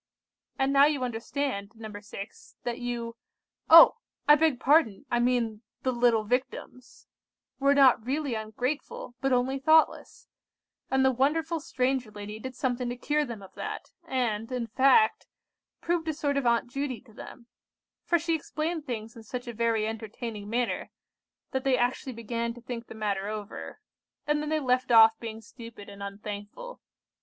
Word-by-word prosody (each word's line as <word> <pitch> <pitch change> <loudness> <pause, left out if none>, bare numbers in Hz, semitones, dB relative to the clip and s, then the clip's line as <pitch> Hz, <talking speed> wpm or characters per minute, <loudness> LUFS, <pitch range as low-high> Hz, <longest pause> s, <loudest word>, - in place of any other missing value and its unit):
"And 270 +1 +1
now 280 0 +7
you 290 -3 +1
understand, 235 -3 -3
No. 215 -2 -8
6, 205 0 -10
that 240 0 -3
you—oh! 240 +6 +4 0.3
I 295 - +9
beg 300 -4 +3
pardon, 260 -8 +3
I 240 - +2
mean 240 -3 0 0.2
the 260 - +1
little 240 -2 +3
Victims—were 255 +3 -3
not 260 -5 +6
really 275 +2 -2
ungrateful, 240 +5 -4
but 270 - +1
only 255 +2 +1
thoughtless; 315 +3 +2 0.6
and 265 0 +2
the 265 - +5
wonderful 315 +6 0
stranger 260 -4 -1
lady 210 +1 -8
did 260 +2 -7
something 250 -1 -1
to 245 - -3
cure 300 +4 0
them 230 -6 -8
of 190 - -14
that, - - -6
and, 240 -5 -1
in 250 -2 -2
fact, 275 - +3 0.5
proved 335 -1 -1
a 315 - -1
sort 285 -2 -1
of 280 -3 0
Aunt 235 0 +2
Judy 265 -1 -3
to 235 -3 -20
them; 235 +2 -11 0.6
for 345 - +2
she 335 0 -1
explained 315 0 -3
things 225 -2 -5
in 230 - -10
such 245 +3 -6
a 240 - -5
very 230 -1 +1
entertaining 220 -1 -6
manner, 240 +2 -1 0.6
that 265 0 -2
they 265 -2 +3
actually 250 +1 -1
began 230 +1 -3
to 240 - -12
think 235 -1 -6
the - - -10
matter 200 -2 -2
over; 210 -1 -7 0.5
and 295 0 +1
then 300 - -3
they 310 0 +1
left 255 -2 +1
off 225 -1 +7
being 225 -1 -7
stupid 230 -1 -12
and 200 0 -11
unthankful. 205 - -7
245 Hz, 160 wpm, -28 LUFS, 225-275 Hz, 0.6 s, I